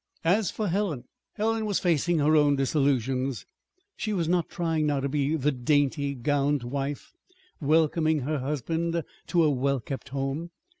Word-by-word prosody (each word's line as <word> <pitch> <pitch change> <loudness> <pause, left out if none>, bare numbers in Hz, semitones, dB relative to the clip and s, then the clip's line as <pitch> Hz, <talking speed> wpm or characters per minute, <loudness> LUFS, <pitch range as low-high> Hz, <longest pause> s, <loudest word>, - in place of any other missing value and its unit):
As 190 +2 +3
for 215 - -2
Helen 175 -8 -1 0.3
Helen 220 0 0
was 205 - +1
facing 175 0 +1
her 155 +1 +3
own 145 -2 +4
disillusions. 135 -2 0 0.5
She 215 - -3
was 170 -5 0
not 175 -1 +1
trying 160 -3 0
now 145 -2 +1
to 135 - -1
be 145 +2 0
the 150 -1 +1
daintily 140 +2 +1
gowned 145 +1 +1
wife 140 +3 -4 0.5
welcoming 155 0 +2
her 150 +3 -1
husband 165 +5 -1 0.2
to 170 -2 +3
a 155 - +4
well 140 0 0
kept 135 +3 -6
home. 135 +5 -3
150 Hz, 155 wpm, -27 LUFS, 135-165 Hz, 0.5 s, own